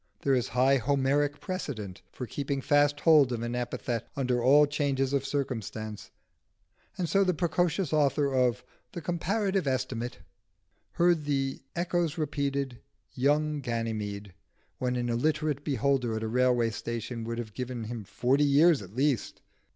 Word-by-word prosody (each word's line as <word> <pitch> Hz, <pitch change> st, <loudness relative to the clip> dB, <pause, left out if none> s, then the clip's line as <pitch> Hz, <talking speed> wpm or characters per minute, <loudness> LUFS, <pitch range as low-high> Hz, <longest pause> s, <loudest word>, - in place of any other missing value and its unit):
There 135 Hz, -, +3 dB
is 125 Hz, -2 st, +1 dB
high 130 Hz, +2 st, +3 dB
Homeric 140 Hz, +3 st, +1 dB
precedent 110 Hz, -, -5 dB
for 125 Hz, -, -6 dB
keeping 140 Hz, +2 st, -3 dB
fast 145 Hz, +1 st, +2 dB
hold 150 Hz, -6 st, +6 dB
of 115 Hz, -1 st, -2 dB
an 120 Hz, 0 st, -3 dB
epithet 120 Hz, -1 st, -3 dB
under 125 Hz, -3 st, 0 dB
all 140 Hz, +4 st, +6 dB
changes 140 Hz, -2 st, 0 dB
of 140 Hz, -2 st, +1 dB
circumstance, 110 Hz, -6 st, -4 dB, 0.9 s
and 180 Hz, -3 st, -1 dB
so 195 Hz, +5 st, +3 dB
the 180 Hz, -2 st, +1 dB
precocious 175 Hz, 0 st, 0 dB
author 140 Hz, -2 st, +2 dB
of 125 Hz, -4 st, +2 dB, 0.3 s
the 170 Hz, -, -5 dB
'Comparative 190 Hz, +1 st, -1 dB
Estimate' 125 Hz, -2 st, -2 dB, 0.8 s
heard 170 Hz, -3 st, +2 dB
the 135 Hz, -2 st, -1 dB
echoes 175 Hz, -2 st, 0 dB
repeating 140 Hz, -4 st, -2 dB, 0.3 s
"Young 150 Hz, +3 st, +1 dB
Ganymede" 110 Hz, -5 st, -3 dB, 0.5 s
when 125 Hz, -1 st, -1 dB
an 120 Hz, -1 st, -1 dB
illiterate 150 Hz, +4 st, 0 dB
beholder 135 Hz, -4 st, 0 dB
at 110 Hz, -, -3 dB
a -, -, -1 dB
railway 120 Hz, -1 st, +2 dB
station 115 Hz, +1 st, -5 dB
would 115 Hz, 0 st, -4 dB
have 110 Hz, -3 st, -6 dB
given 125 Hz, -1 st, -4 dB
him 115 Hz, 0 st, -5 dB
forty 125 Hz, +8 st, +1 dB
years 145 Hz, +1 st, +5 dB
at 95 Hz, +2 st, -12 dB
least. 135 Hz, -2 st, 0 dB
135 Hz, 145 wpm, -29 LUFS, 120-150 Hz, 0.9 s, hold